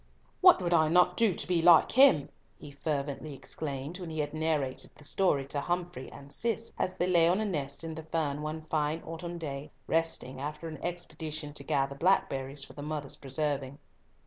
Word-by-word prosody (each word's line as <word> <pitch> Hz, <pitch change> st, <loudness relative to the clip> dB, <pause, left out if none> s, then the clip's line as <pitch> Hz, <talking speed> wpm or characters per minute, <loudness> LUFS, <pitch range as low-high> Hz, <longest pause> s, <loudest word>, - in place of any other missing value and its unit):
"What 365 Hz, -1 st, +8 dB
would 175 Hz, 0 st, +1 dB
I 160 Hz, -2 st, +5 dB
not 180 Hz, +1 st, +4 dB
do 225 Hz, -6 st, +3 dB
to -, -, -4 dB
be 175 Hz, -2 st, +2 dB
like 170 Hz, -1 st, +7 dB
him!" 260 Hz, -, +6 dB, 0.3 s
he 145 Hz, -, -10 dB
fervently 145 Hz, 0 st, -3 dB
exclaimed 145 Hz, +4 st, -5 dB
when 175 Hz, -2 st, -6 dB
he 160 Hz, -, -6 dB
had 150 Hz, -1 st, -2 dB
narrated 155 Hz, -4 st, -1 dB
the -, -, -15 dB
story 145 Hz, -3 st, +2 dB
to 145 Hz, -, -1 dB
Humfrey 175 Hz, -4 st, -3 dB
and 140 Hz, 0 st, -10 dB
Cis, 230 Hz, 0 st, -1 dB
as 185 Hz, -, 0 dB
they 175 Hz, -, +1 dB
lay 170 Hz, -2 st, +4 dB
on 185 Hz, +3 st, +2 dB
a 220 Hz, -, 0 dB
nest 145 Hz, -7 st, -3 dB
in 165 Hz, -1 st, -4 dB
the 160 Hz, -, -6 dB
fern 155 Hz, -2 st, -2 dB
one 155 Hz, +1 st, -4 dB
fine 155 Hz, 0 st, -1 dB
autumn 170 Hz, +1 st, -6 dB
day, 145 Hz, -3 st, -5 dB, 0.2 s
resting 165 Hz, -6 st, -1 dB
after 150 Hz, +3 st, -5 dB
an 155 Hz, -1 st, -8 dB
expedition 155 Hz, -3 st, -4 dB
to 140 Hz, -, -7 dB
gather 135 Hz, 0 st, 0 dB
blackberries 140 Hz, -4 st, +1 dB
for -, -, -10 dB
the 145 Hz, -, -8 dB
mother's 150 Hz, -1 st, -4 dB
preserving. 140 Hz, -1 st, -2 dB
155 Hz, 195 wpm, -30 LUFS, 140-175 Hz, 0.3 s, What